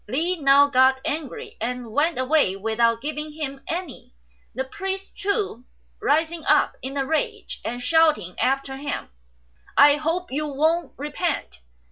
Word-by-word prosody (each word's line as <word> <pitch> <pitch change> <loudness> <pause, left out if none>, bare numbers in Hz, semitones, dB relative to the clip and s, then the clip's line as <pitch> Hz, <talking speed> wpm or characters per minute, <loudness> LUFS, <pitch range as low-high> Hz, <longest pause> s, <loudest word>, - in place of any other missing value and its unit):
Li 320 - +1
now 280 -3 +6
got 265 -1 +4
angry, 295 -4 -4
and 245 0 -3
went 310 +8 +1
away 260 -6 +2
without 225 +3 +1
giving 300 +1 -4
him 280 -3 -5
any, 340 -5 -5 0.4
the 260 - -1
priest, 385 +7 -5
too, 400 - -2 0.4
rising 320 +2 +1
up - - +3
in 270 +2 -5
a 270 - 0
rage 315 +2 -2
and 245 +1 -4
shouting 305 - +3
after 270 0 0
him, 285 +1 -4 0.7
"I 290 +1 +7
hope 330 +3 -2
you 300 +3 -1
won't 315 +2 0
repent." 290 - -3
285 Hz, 140 wpm, -24 LUFS, 260-320 Hz, 0.7 s, I